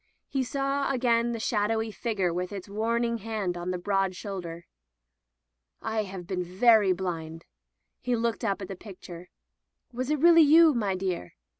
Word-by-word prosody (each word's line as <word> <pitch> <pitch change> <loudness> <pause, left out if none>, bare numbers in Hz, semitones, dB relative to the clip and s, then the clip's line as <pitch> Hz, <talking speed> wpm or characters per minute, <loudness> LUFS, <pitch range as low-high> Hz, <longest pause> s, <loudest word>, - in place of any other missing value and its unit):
He 270 -2 -1
saw 275 +3 -1
again 240 -2 +2
the 230 - -3
shadowy 220 0 0
figure 200 -6 -1
with 180 +2 -3
its 195 -2 -7
warning 230 +3 -1
hand 210 -4 -3
upon 175 +1 -4
the 180 - -1
broad 195 0 0
shoulder. 175 -4 -6 0.6
" - - -53 0.2
I 215 - 0
have 190 -2 -8
been 180 0 -2
very 205 +2 +4
blind." 165 -3 -4 0.5
He 250 -1 -1
looked 230 +1 -1
up 200 -2 -1
at - - -6
the 195 - -6
picture. 180 -3 -11 0.6
"Was 255 +2 -3
it 305 - +2
really 335 +2 +7
you, 315 +1 +7
my 205 -6 0
dear 185 - -4
200 Hz, 165 wpm, -27 LUFS, 180-235 Hz, 0.6 s, really